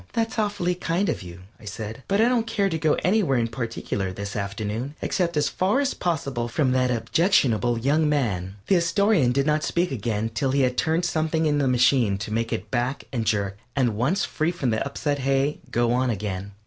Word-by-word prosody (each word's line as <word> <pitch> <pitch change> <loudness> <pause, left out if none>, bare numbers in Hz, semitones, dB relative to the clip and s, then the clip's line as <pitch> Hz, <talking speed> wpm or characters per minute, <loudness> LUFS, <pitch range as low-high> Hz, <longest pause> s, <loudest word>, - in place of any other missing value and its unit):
"That's 225 0 -1
awfully 205 -4 0
kind 180 +2 -1
of 155 - -2
you," 90 -1 -10 0.2
I - - -15
said, 110 +3 -6
"but 200 +1 +1
I 225 - +5
don't 240 -2 +1
care 205 -3 +1
to 160 -2 -2
go 155 0 +2
anywhere 180 - +2
in 115 -1 +1
particular 115 -5 -3
this 100 +2 -6
afternoon, 105 +7 -3
except 170 -4 -1
as 150 - +2
far 195 +8 +1
as 280 -1 0
possible 140 -8 -2
from 130 +3 +1
that 125 0 +2
objectionable 120 - +2
young 150 +6 +2
man." 100 -10 -1
The 190 - +3
Astorian 170 - +3
did 135 +2 +1
not 150 0 +2
speak 175 +1 0
again 115 -2 -2
till 135 +2 0
he 140 - +3
had 125 -1 +1
turned 165 +5 +1
something 160 -1 0
in 145 -1 +2
the 140 - +1
machine 125 -4 +3
to 100 +2 -5
make 115 +1 -1
it 115 - -4
back 125 +2 -1
and 115 -3 -2
jerk, 100 -2 0 0.2
and, 125 -6 +1
once 145 - +1
free 155 +1 -1
from 170 -8 -1
the 110 - 0
upset 145 +1 -2
hay, 135 +2 +1
go 120 0 +1
on 130 +1 +1
again. 100 -2 -4
135 Hz, 210 wpm, -24 LUFS, 115-165 Hz, 0.2 s, I